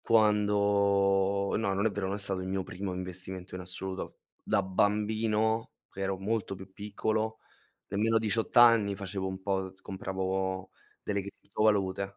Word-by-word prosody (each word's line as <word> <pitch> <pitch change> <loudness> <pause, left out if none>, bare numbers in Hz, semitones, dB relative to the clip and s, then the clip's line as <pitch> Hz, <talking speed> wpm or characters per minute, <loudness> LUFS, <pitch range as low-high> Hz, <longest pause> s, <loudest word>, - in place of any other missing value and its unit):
Quando 100 -2 +3
no, 100 -3 0
non 100 +2 0
è 110 - +3
vero, 100 -1 -2
non 95 - -1
è - - -5
stato 100 -1 +3
il 95 - -5
mio 95 0 -1
primo 95 +1 -5
investimento 90 0 -5
in 90 - -4
assoluto. 95 +1 -5 0.2
Da 100 - +1
bambino, 110 +4 +1 0.2
ero 95 0 -2
molto 100 0 -2
più 95 0 -12
piccolo, 110 +2 -2 0.5
nemmeno 110 +3 +2
18 110 +2 +1
anni 115 -4 +6
facevo 95 -1 -4
un 95 0 -4
po', 100 +1 -2
uhm, 95 -1 -3
compravo 95 0 -3 0.3
delle 100 -1 -1
criptovalute. 100 -1 0
100 Hz, 150 wpm, -30 LUFS, 95-105 Hz, 0.5 s, anni